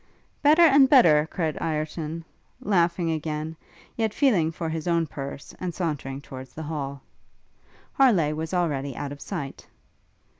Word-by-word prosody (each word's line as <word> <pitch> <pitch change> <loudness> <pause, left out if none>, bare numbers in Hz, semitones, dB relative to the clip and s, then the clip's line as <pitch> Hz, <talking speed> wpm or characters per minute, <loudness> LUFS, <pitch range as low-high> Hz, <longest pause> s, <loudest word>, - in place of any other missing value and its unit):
'Better 305 +4 +6
and 280 -4 +6
better!' 160 - +6
cried 160 -5 -2
Ireton, 155 +1 -3 0.3
laughing 170 -3 +1
again, 155 0 -3 0.4
yet 220 -2 -1
feeling 200 - +3
for 165 0 -5
his 160 +1 -4
own 170 -1 +2
purse, 140 -1 -7
and 180 -2 -4
sauntering 140 -6 -3
towards 130 -2 -10
the 160 - -6
hall. 140 -3 -5 0.9
Harleigh 195 - +4
was 160 +1 -4
already 145 -7 -1
out 140 - -5
of 145 - -9
sight. 135 -1 -6
160 Hz, 140 wpm, -25 LUFS, 150-180 Hz, 0.9 s, Better